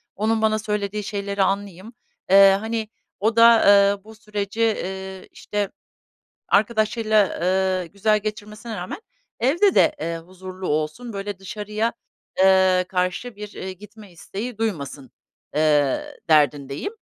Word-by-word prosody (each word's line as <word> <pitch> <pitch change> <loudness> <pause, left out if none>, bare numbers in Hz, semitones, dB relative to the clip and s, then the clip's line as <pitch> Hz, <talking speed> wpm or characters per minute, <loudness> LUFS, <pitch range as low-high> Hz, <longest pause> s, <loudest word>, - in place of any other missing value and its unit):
Onun 220 +2 0
bana 215 0 +2
söylediği 210 -1 -3
şeyleri 200 -1 -2
anlayayım. 200 +2 -3 0.4
Iıı, 195 0 +8
hani 220 +1 -3 0.3
o 220 +2 +1
da 230 0 +7
eee 200 0 +5
bu 220 0 -14
süreci, 210 0 -5 0.2
ııı 190 0 -7
,işte 205 -1 -4 0.8
arkadaşıyla, 215 -1 +2
ııı, 185 0 +1
güzel 210 +4 +1
geçirmesine 210 +1 -6
rağmen 180 - -6 0.4
evde 340 - +3
de, 310 - +4
eee, 165 0 -3
huzurlu 185 +2 -9
olsun. 155 +11 -2
Böyle 200 -1 -5
dışarıya, 210 +3 -3 0.5
ııı, 190 -1 +4
karşı 185 +6 -2
bir, 210 0 -7
iii, 185 -1 -7
gitme 210 -1 -14
isteği 210 +7 -7
duymasın, 145 - -4 0.5
ııı, 150 -3 +1
derdindeyim. 145 - +2
200 Hz, 125 wpm, -22 LUFS, 185-215 Hz, 0.8 s, Iıı